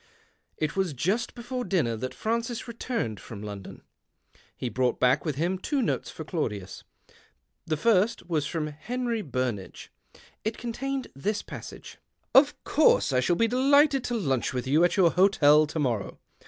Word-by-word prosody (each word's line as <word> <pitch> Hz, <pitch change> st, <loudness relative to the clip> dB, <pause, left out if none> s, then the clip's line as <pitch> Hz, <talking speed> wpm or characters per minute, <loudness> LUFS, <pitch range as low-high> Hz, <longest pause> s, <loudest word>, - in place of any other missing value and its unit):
It 155 Hz, -1 st, -2 dB
was 190 Hz, -5 st, 0 dB
just 195 Hz, -, -1 dB
before 250 Hz, +1 st, -4 dB
dinner 165 Hz, -, 0 dB
that 130 Hz, +4 st, -5 dB
Francis 230 Hz, +2 st, -2 dB
returned 230 Hz, -, -3 dB
from 105 Hz, -3 st, -9 dB
London. 100 Hz, -2 st, -8 dB, 0.7 s
He 125 Hz, -, -3 dB
brous 125 Hz, 0 st, +1 dB
ht -, -, -33 dB
back 125 Hz, +5 st, +3 dB
with 155 Hz, -4 st, -1 dB
him 175 Hz, +6 st, -1 dB
two 285 Hz, +8 st, -1 dB
notes 245 Hz, -, -1 dB
for 160 Hz, -, -7 dB
Claudius. 105 Hz, -, -4 dB, 0.8 s
The 155 Hz, -1 st, 0 dB
first 210 Hz, 0 st, +2 dB
was 155 Hz, -5 st, 0 dB
from 160 Hz, -1 st, -2 dB
Henry 230 Hz, +10 st, -3 dB
Burnage. 125 Hz, -, -4 dB, 0.5 s
It 220 Hz, +1 st, -2 dB
contained 265 Hz, +3 st, -4 dB
this 205 Hz, +11 st, -2 dB, 0.5 s
" -, -, -32 dB
Of 280 Hz, +2 st, +5 dB
course 300 Hz, -, +3 dB
I 125 Hz, -, +3 dB
shall 150 Hz, +7 st, +2 dB
be 230 Hz, +5 st, +2 dB
delighted 275 Hz, +2 st, +4 dB
to 240 Hz, -, -2 dB
lunch 135 Hz, -, -1 dB
with 125 Hz, -, -2 dB
you 150 Hz, +6 st, +3 dB
at 175 Hz, +2 st, +2 dB
your 175 Hz, -4 st, +5 dB
hotel 155 Hz, -5 st, +5 dB
to 155 Hz, -, -6 dB
morrow. 120 Hz, -8 st, -1 dB
175 Hz, 165 wpm, -27 LUFS, -, 0.8 s, Of